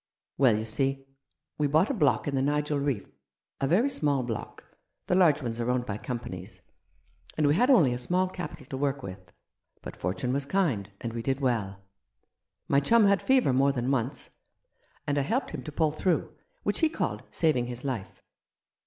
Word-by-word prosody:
" - - -62
Well, 125 -6 +5
you 110 - -3
see, 135 +4 -1 0.5
we 150 - +3
bought 155 - +3
a - - 0
block 150 - +2
in 145 - -1
the 135 - +1
Nigel 150 +1 0
Reef 140 -8 -1 0.3
— - - -32
a 135 - +2
very 195 - +3
small 145 - 0
block, 115 -3 -6 0.4
the - - 0
large 165 -6 +4
ones 115 -1 -3
are 120 +1 -1
owned 125 0 0
by 105 -3 -4
companies 95 -8 -6 0.4
— - - -24
and 155 - +2
we 145 - +4
had 245 - +3
only 165 - +5
a 125 - -4
small 180 +8 +1
capital 175 -5 -7
to 135 - -6
work 140 -1 -1
with; 95 -2 -9 0.5
but - - -7
Fortune 95 +8 -2
was 140 0 -1
kind, 140 - 0
and 115 -1 -4
we 115 - -3
did 135 +3 -1
well. 105 -7 -1 0.8
My 140 - +4
chum 225 +9 +4
had 200 -1 +4
fever 260 - +3
more 135 +2 +4
than 125 0 -1
once, 130 +1 -1 0.7
and 145 0 +1
I - - +2
helped 230 - -1
him - - -5
to 155 - -6
pull 155 +1 +1
through, 170 +3 0 0.3
which - - 0
he 320 - +4
called - - -2
saving 150 -7 +1
his 125 +2 -6
life. 120 -8 -5
140 Hz, 200 wpm, -28 LUFS, 120-155 Hz, 0.8 s, Well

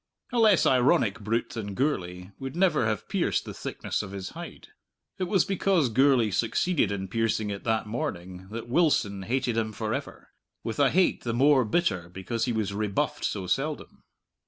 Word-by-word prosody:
A 245 - 0
less 215 -5 +5
ironic 120 -4 +3
brute 115 +3 -1
than 100 -4 -5
Gourlay 90 -9 -2
would 135 +2 -6
never 170 - +3
have 105 -1 -2
pierced - - 0
the - - -7
thickness - - -4
of 100 -2 -8
his 95 -2 -5
hide. - - -10 0.5
It 185 - 0
was 185 -1 +2
because 190 -7 +2
Gourlay 130 -2 +3
succeeded 115 - +1
in 95 -1 -3
piercing 110 0 0
it 100 - -6
that 110 -1 +1
morning 95 -4 -5
that 115 +2 -6
Wilson 120 - +2
hated 120 +3 -1
him 110 -1 0
for 110 0 -3
ever - - -6 0.3
with 115 +2 -4
a 140 -2 +5
hate 185 +5 +2
the 115 -1 -2
more 135 +1 +5
bitter 100 - 0
because 105 +6 -3
he 125 - -1
was 110 -3 -1
rebuffed 105 -1 -1
so 95 -3 -2
seldom. 135 - -3
115 Hz, 180 wpm, -27 LUFS, 100-135 Hz, 0.5 s, less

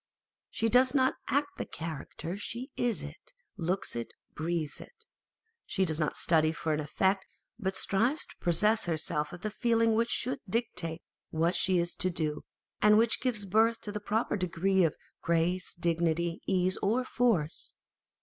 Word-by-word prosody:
She 225 - 0
does 250 +3 +4
not 260 -1 +4
act 285 +1 0
the - - -2
character 160 0 -6
â€" 190 +4 -4
she 245 +5 -5
is 240 -3 0
it, - - -11 0.2
looks 185 0 -2
it, 115 0 -5 0.2
breathes 160 -1 -2
it. - - -14 0.6
She 190 -2 +1
does 160 -2 -1
not 155 - 0
study 160 -2 +3
for 160 -1 -2
an 150 - 0
effect, 190 +6 0 0.3
but 190 -3 -1
strives 235 +10 +1
to - - -16
possess 210 +6 +2
herself 155 -3 -1
of 175 - -9
the 215 - -3
feeling 230 0 +2
which 230 +2 +2
should 250 +1 0
dictate 180 -7 -2 0.3
what 165 +3 +1
she 185 -1 +3
is 170 0 +1
to 185 - +2
do, 155 -4 -2 0.4
and 210 0 +7
which 225 0 +3
gives 230 -6 -1
birth 220 +4 +3
to 205 - -5
the 210 - -3
proper 215 +2 0
degree 185 +1 +2
of 160 - +2 0.3
grace, 170 +2 0
dignity, 170 0 0
ease, 185 -1 +2
or 230 +6 +1
force. 230 -12 0
190 Hz, 170 wpm, -30 LUFS, 165-225 Hz, 0.6 s, and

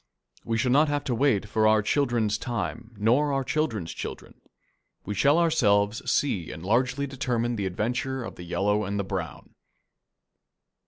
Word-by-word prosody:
We 115 - -1
shall 125 +2 +1
not 150 +4 +5
have 145 0 -1
to 130 - -2
wait 120 -5 +2
for 110 +1 +2
our 110 -1 +4
children's 115 -5 +1
time 120 -1 -4
nor 125 +8 +2
our 135 -1 0
children's 115 - -2
children. - - -8 0.6
We 105 - -3
shall 140 - +3
ourselves 115 -11 +2
see 100 - 0
and 80 +3 -8
largely 125 +6 +1
determine 125 -3 -1
the 100 -3 -2
adventure 120 +7 -2
of - - -7
the - - -11
Yellow 105 +4 0
and 100 +1 -3
the 100 - 0
Brown. 95 - -6
115 Hz, 160 wpm, -26 LUFS, 105-135 Hz, 0.6 s, not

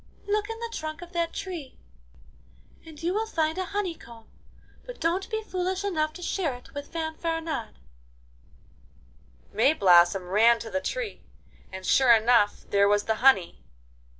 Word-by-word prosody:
look 415 +1 -1
in 450 - -5
the 465 0 -6
trunk 310 -1 -5
of 350 - -12
that 335 -1 -1
tree, 350 -9 -7 1.1
and 320 -1 -13
you 350 +2 0
will 440 +2 -1
find 320 -3 -1
a 370 - -1
honeycomb, 330 - -6 0.6
but - - -10
don't 350 +4 -1
be 440 -1 -3
foolish 375 -1 -3
enough 310 -6 0
to 355 +3 -10
share 335 -8 -1
it 250 +2 -15
with 285 0 -7
Fanfaronade.' 325 -5 -4 1.8
Mayblossom 185 - +4
ran 230 +4 +5
to 225 -1 -8
the 280 - -1
tree, 475 - -4 0.5
and 190 0 -8
sure 255 +2 +5
enough 225 -2 +3
there 200 0 +4
was 205 0 +2
the 220 -1 -1
honey. 250 -10 +3
315 Hz, 150 wpm, -26 LUFS, 235-370 Hz, 1.8 s, ran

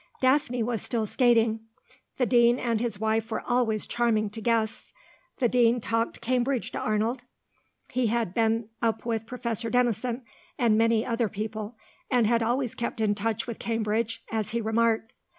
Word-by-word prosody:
Daphne 260 -2 +2
was 230 -1 -2
still 230 -3 -1
skating. 230 -1 +3 0.6
The 250 - +2
Dean 240 0 +4
and 230 -4 0
his 230 -4 -2
wife 220 +1 0
were 220 - -3
always 240 -4 +1
charming 220 -3 +1
to 225 - -7
guests. 230 0 -1 0.4
The 245 - +3
Dean 240 0 +3
talked 230 0 -1
Cambridge 250 +1 0
to - - -4
Arnold. 220 +4 0 0.7
He 250 -2 +1
had 225 -4 0
been 225 0 +1
up 230 -1 0
with 225 -2 -2
Professor 235 -2 -3
Denison, 245 0 0 0.3
and 230 -3 +3
many 225 0 +3
other 230 -2 0
people, 215 +2 -5 0.3
and 245 -3 +3
had 230 +1 +2
always 240 +2 0
kept 235 0 -4
in 215 -2 +2
touch 215 +1 -2
with 235 -2 -6
Cambridge, 225 0 -1
as 220 -3 -1
he 235 - -1
remarked. 225 +1 +1
230 Hz, 165 wpm, -27 LUFS, 220-240 Hz, 0.7 s, Dean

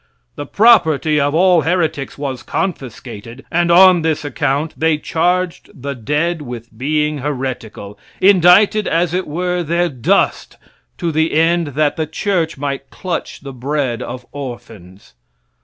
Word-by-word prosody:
The 145 - -7
property 160 - +4
of 145 +1 0
all 180 -1 +4
heretics 160 -3 -1
was 135 -4 -4
confiscated, 120 - -6
and 175 0 +1
on 180 0 +7
this 155 -2 -1
account 145 +2 -1
they 160 -1 +1
charged 175 +3 -1
the 140 +2 -4
dead 150 +7 -1
with 120 -4 -9
being 150 +4 -1
heretical 125 -7 -5 0.2
indicted, 200 +3 +5
as 170 0 0
it 185 +1 -2
were, 180 +3 -2
their 170 +2 0
dust 125 -6 0 0.4
to 170 -2 -2
the 160 +1 0
end 165 +1 +2
that 150 -1 +1
the 160 -1 -2
church 165 -1 -1
might 140 -1 -4
clutch 180 -2 -5
the 140 -1 -8
bread 130 -1 -2
of 125 +1 -7
orphans. 115 - -10
150 Hz, 140 wpm, -17 LUFS, 135-175 Hz, 0.4 s, on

